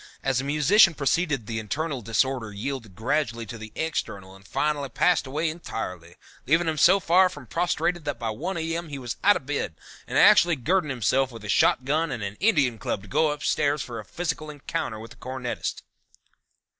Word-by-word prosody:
As 135 -2 +1
the - - -2
musician 160 +6 +5
proceeded 140 -3 0
the 110 +1 -3
internal 140 +5 -3
disorder 115 +1 0
yielded 110 -1 -5
gradually 115 0 -1
to 115 +2 -8
the 110 0 -9
external 100 -12 -4
and 95 0 -17
finally 150 -2 -1
passed 160 +4 +2
away 150 +5 -1
entirely, 90 - -6 0.3
leaving 165 +3 +3
him 155 -2 -1
so 190 +6 +6
far 185 +1 +4
from 145 -7 -10
prostrated 175 +3 -1
that 145 -4 -2
by 115 -2 -3
one 170 - -4
A.M. 165 0 -3
he 140 - -5
was 125 -2 -5
out 205 +1 +6
of - - -5
bed 145 - -2 0.3
and - - -2
actually 175 -1 +6
girding 160 +5 0
himself 130 +1 +1
with 115 -2 -10
a 105 - -7
shotgun 150 +10 +2
and 110 - -4
an 100 +1 -4
Indian 140 - +2
Club 100 -1 -3
to - - -13
go 155 +10 +2
upstairs 150 0 0
for 120 -2 -7
a - - -7
physical 155 -3 -4
encounter 145 -5 -4
with 115 +1 -10
the 120 - -14
cornetist." 125 +1 -4
140 Hz, 190 wpm, -25 LUFS, 115-160 Hz, 0.3 s, so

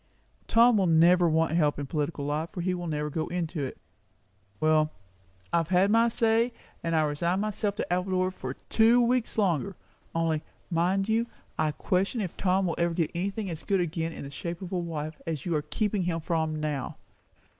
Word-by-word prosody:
"Tom 230 0 +5
will 190 -2 +3
never 170 +2 +5
want 160 0 +2
help 155 -3 +2
in 145 - -3
political 145 0 -2
life, 150 +3 -1
for 185 - -5
he 185 +1 0
will 175 -1 -4
never 150 -1 -1
go 155 +2 -2
into 170 -3 -2
it. 130 - -5 0.8
Well, 155 0 +3 0.6
I - - +5
have 165 -2 +1
said 185 +3 +3
my 230 +1 +5
say, 230 +1 +2 0.3
and 165 0 0
resign 160 +4 +1
myself 210 -1 -1
to 180 - -2
Appledore 185 0 0
for 130 -7 -6 0.2
two 230 +2 +5
weeks 245 -1 +1
longer. 195 -2 +1 0.4
Only, 165 -2 +1 0.3
mind 185 +4 +1
you, 225 +2 +1 0.3
I 155 - +2
question 195 - 0
if 190 -6 -3
Tom 190 0 +1
will 170 - 0
ever 170 0 +1
get 165 -2 0
anything 195 +4 -2
as 160 - -6
good 195 -2 +1
again 165 -1 -1
in - - -8
the 140 - -8
shape 170 +5 -5
of 180 - -7
a 185 - 0
wife, 155 -2 -5
as 155 -4 -3
you 175 - 0
are 150 - +1
keeping 205 +6 -1
him 175 -2 -1
from 160 -1 -1
now. 150 -3 -3
170 Hz, 195 wpm, -28 LUFS, 155-195 Hz, 0.8 s, Tom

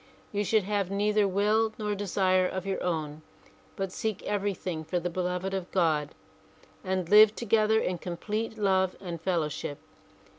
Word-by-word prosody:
You 205 0 0
should 215 +1 +2
have 200 -1 -1
neither 205 +1 +2
will 210 +3 +2
nor 210 -1 -2
desire 185 -2 +2
of 185 0 -4
your 195 -1 -2
own 155 -3 -2 0.5
but 195 -1 -3
seek 215 +1 -3
everything 190 -5 -2
for 175 +3 -1
the 175 +1 -3
beloved 180 +2 -2
of 190 -2 -3
God 155 -5 +1 0.7
and 185 -2 -1
live 210 +2 +7
together 220 -1 +2
in 180 -5 -2
complete 215 +6 -4
love 190 -3 +2
and 170 -4 -6
fellow 170 -3 0
ship. 145 -1 -5
190 Hz, 155 wpm, -28 LUFS, 175-210 Hz, 0.7 s, live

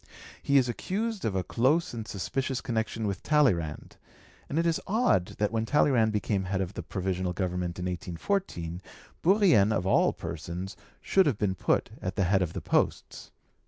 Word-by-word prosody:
He 140 - +3
is 130 -2 +4
accused 205 - -3
of 100 - -1
a 95 - 0
close 130 - +1
and 110 -2 -5
suspicious 130 +6 -2
connection 115 -1 -2
with 100 -2 -2
Talleyrand, 100 - +1 0.5
and 145 - -2
it 165 - +2
is 165 -1 +1
odd 190 - +1
that 105 0 0
when 115 -1 0
Talleyrand 125 -6 +3
became 100 -2 -1
head 95 +1 -1
of 95 0 -3
the - - -5
Provisional 95 -2 -2
Government 90 -1 -2
in 90 - -4
1814, 90 - -3 0.4
Bourrienne 170 - +5
of 95 -4 0
all 95 - +4
persons 90 +3 -6 0.3
should 190 -3 +3
have 130 -8 +1
been 100 -3 0
put - - 0
at 95 +1 -3
the 100 - +1
head 95 +2 +2
of 85 -2 -1
the - - -4
posts. - - -1
105 Hz, 175 wpm, -28 LUFS, 90-140 Hz, 0.5 s, Bourrienne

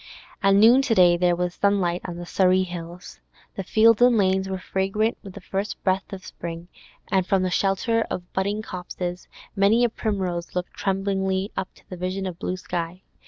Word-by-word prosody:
At 195 -1 +4
noon 230 +6 +7
to 255 -5 +1
day 175 -2 +6
there 175 0 +2
was 180 0 -2
sunlight 185 -3 +1
on 175 -2 -5
the 175 - -6
Surrey 185 +1 +3
hills; 175 0 -8 0.3
the 195 - -5
fields 220 +4 +4
and 245 -1 +6
lanes 190 -1 +1
were 190 - -2
fragrant 195 +4 -1
with 195 -3 -10
the 200 - -10
first 195 +3 -4
breath 190 +1 0
of 190 -1 -8
spring, 170 +1 -7 0.4
and 190 -1 +3
from 195 -1 +2
the 185 - -1
shelter 195 +5 +1
of 175 0 -6
budding 200 +3 -1
copses 180 -2 -6 0.3
many 205 +4 +4
a 240 - +3
primrose 190 -7 -3
looked 180 0 -3
tremblingly 195 0 -1
up 190 - -4
to - - -21
the 185 - -8
vision 185 +2 -3
of 180 -2 -6
blue 185 - -3
sky. 175 0 -5
190 Hz, 190 wpm, -24 LUFS, 180-200 Hz, 0.4 s, noon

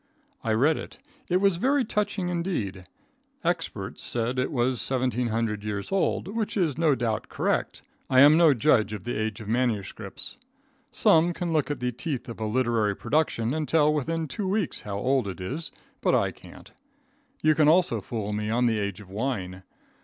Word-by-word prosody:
I 110 - +1
read 145 +8 +3
it. - - -8 0.3
It 180 +1 +2
was 195 -3 +3
very 270 +6 +2
touching 205 -3 -1
indeed. 165 - -3 0.6
Experts - - -2
said 120 +2 -1
it 130 - 0
was 125 -2 0
1,700 115 -4 0
years 100 -2 -4
old, 195 -1 0
which 220 0 -2
is 165 -8 +1
no 160 -3 +3
doubt 115 -4 -2
correct. - - -1 0.3
I 130 -1 +6
am 145 +2 +8
no 160 -4 +6
judge 110 -5 +3
of 105 - -6
the 120 - -3
age 110 -1 -2
of 105 - -9
MSS. 110 - -2 0.5
Some 175 -5 +4
can 170 -1 -3
look 155 -2 +1
at 145 -4 -3
the 125 0 0
teeth 130 +1 -4
of 115 - -8
a 110 - -2
literary 115 -3 +1
production 135 -5 0
and 155 -1 -2
tell 150 -2 +3
within 160 +2 -1
two 190 +8 -4
weeks 200 -2 -1
how 100 -1 -5
old 130 +1 +1
it 95 - -6
is, 140 - -4 0.3
but - - +3
I - - +2
can't. - - -14 0.7
You 155 - +5
can 150 0 +3
also 175 +3 +3
fool 105 -4 -4
me 105 0 -2
on 120 +2 +2
the 110 -2 +2
age 100 -1 -3
of 100 - -14
wine. 100 -5 -3
130 Hz, 185 wpm, -26 LUFS, 110-160 Hz, 0.7 s, am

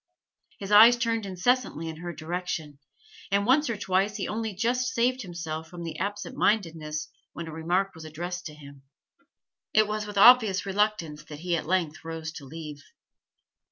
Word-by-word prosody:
His 195 0 -7
eyes 225 +4 +9
turned 230 -3 -1
incessantly 185 - 0
in 160 -1 -6
her 175 +1 -5
direction, 160 -2 -5 0.5
and 200 +1 +2
once 280 +4 +3
or 230 - -2
twice 195 +2 0
he - - -3
only 220 0 -3
just 250 +5 0
saved 250 +2 +1
himself 165 -4 -6
from 175 -1 -8
absent 205 +2 -4
mindedness 160 -7 0 0.3
when 170 0 -6
a - - -6
remark 175 +5 0
was 160 -1 -11
addressed 175 +4 -5
to 150 - -10
him. 140 -2 -13 0.9
It 215 0 +5
was 210 0 -3
with 205 -1 -7
obvious 220 -3 +7
reluctance 195 -7 -1
that 150 0 -10
he 175 -1 0
at 160 - -3
length 175 -3 -1
rose 160 -1 -5
to 150 -3 -10
leave. 150 0 -8
180 Hz, 165 wpm, -27 LUFS, 160-210 Hz, 0.9 s, eyes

